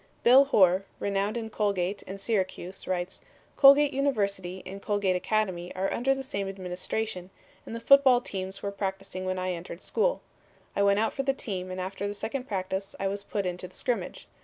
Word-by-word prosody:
Bill 260 +3 +8
Horr, 190 -8 +4 0.2
renowned 200 +3 0
in 225 -1 -5
Colgate 200 -2 0
and 195 +1 -6
Syracuse, 190 -3 -2
writes: 180 0 -2 0.3
"Colgate 280 +1 +7
University 200 -9 -1
and 195 +2 -8
Colgate 205 -3 +1
Academy 185 -3 -1
are 190 +1 -1
under 270 +3 +2
the 270 - -5
same 200 -7 -3
administration, 185 +1 -4 0.4
and 225 - -5
the - - -4
football 265 0 +6
teams 190 -4 -5
were 200 - -2
practicing 195 -1 -4
when 185 0 -1
I 185 0 -1
entered 170 0 -7
school. - - 0 0.5
I - - +1
went 200 0 +4
out 220 +1 +1
for 275 - -1
the 270 0 +1
team 190 -8 -5
and 185 0 -5
after 195 +2 -3
the 205 - -4
second 250 +5 -4
practice 190 0 -3
I 195 - 0
was 200 +1 -3
put 200 -1 -3
into 180 0 -3
the 180 - -17
scrimmage. 245 -2 -3
200 Hz, 185 wpm, -28 LUFS, 185-225 Hz, 0.5 s, Bill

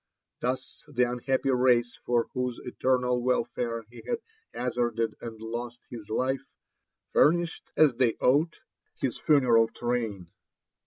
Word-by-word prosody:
Thus 130 +1 -3
the 135 -4 +1
.unhappy 125 +2 0
race 125 -2 +3
for 120 -1 +3
whose 125 -2 -2
eternal 125 0 +1
welfare 120 -2 -1
he 120 - -11
had 475 - 0 0.3
hazafrded 120 -2 -1
and 115 -2 -7
lost 120 +2 -5
his 115 -4 -8
life, 130 +4 0 0.7
furnished, 170 +2 +3
as 150 -4 +6
they 125 -3 +3
ought, 150 +6 +2 0.4
his - - -2
funeral 120 -6 +5
train. 115 -7 -3
125 Hz, 120 wpm, -28 LUFS, 120-130 Hz, 0.7 s, as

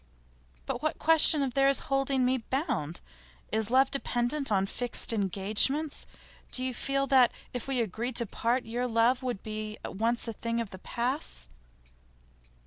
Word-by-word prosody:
'But - - -4
what 310 0 -2
question 315 -2 +7
is 260 -3 -3
there 275 0 +3
of 275 - +4
holding 270 -1 0
me 260 +1 +1
bound? 225 - -3 0.5
Is 220 0 -1
love 260 +2 +3
dependent 270 0 -2
on 195 -1 +2
fixed 240 +3 -1
engagements? 215 - +2 0.4
Do 255 - 0
you 255 0 -2
feel 275 +2 -1
that, 260 -3 +4 0.2
if 245 0 -5
we 265 -3 0
agreed 230 +4 -4
to 235 - +3
part, 240 +4 -1
your 240 +2 -2
love 235 +2 +2
would 245 -6 -4
be 215 0 -6
at - - -7
once 230 +3 0
a 230 - -4
thing 230 +2 -3
of 230 -4 -4
the 190 - -10
past? 235 - -3
245 Hz, 165 wpm, -28 LUFS, 220-270 Hz, 0.5 s, question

